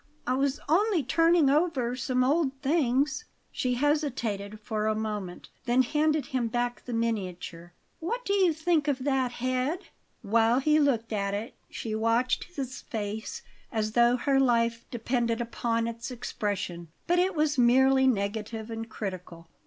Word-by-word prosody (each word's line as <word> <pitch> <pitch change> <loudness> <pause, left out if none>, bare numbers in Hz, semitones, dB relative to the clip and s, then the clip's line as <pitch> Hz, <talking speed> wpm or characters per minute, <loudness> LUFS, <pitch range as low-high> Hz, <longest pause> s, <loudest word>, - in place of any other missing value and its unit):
I 250 - +1
was 275 +2 0
only 365 +1 +3
turning 330 +3 +4
over 275 -5 +1
some 255 0 0
old 280 +1 +2
things." 290 - +1 0.3
She 250 -1 -1
hesitated 240 -8 -1
for 215 0 -2
a 215 - +1
moment; 210 -4 -4 0.2
then 245 +2 +4
handed 300 +3 +1
him 250 -3 -1
back 240 +1 -2
the 250 - -6
miniature. 185 -7 -3 0.3
"What 470 +10 -3
do 400 - 0
you 380 -4 +4
think 315 -1 +1
of 270 -3 0
that 265 -3 +1
head?" 255 +9 -2 0.3
While 225 +3 +3
he 305 +3 +3
looked 235 -6 +1
at 200 -1 -1
it 215 +3 -5 0.2
she 220 - -5
watched 230 +3 +1
his 260 -2 -5
face 220 - -5 0.3
as 215 -2 -1
though 240 +2 +4
her 270 +2 +2
life 235 -3 +2
depended 235 -1 -1
upon 230 -1 -1
its 230 +1 -5
expression; 205 -8 -4 0.2
but 350 +1 +2
it 370 +1 +1
was 300 -3 +1
merely 265 +2 +5
negative 220 0 -2
and 225 0 -5
critical. 180 -5 -7
245 Hz, 155 wpm, -28 LUFS, 220-285 Hz, 0.3 s, merely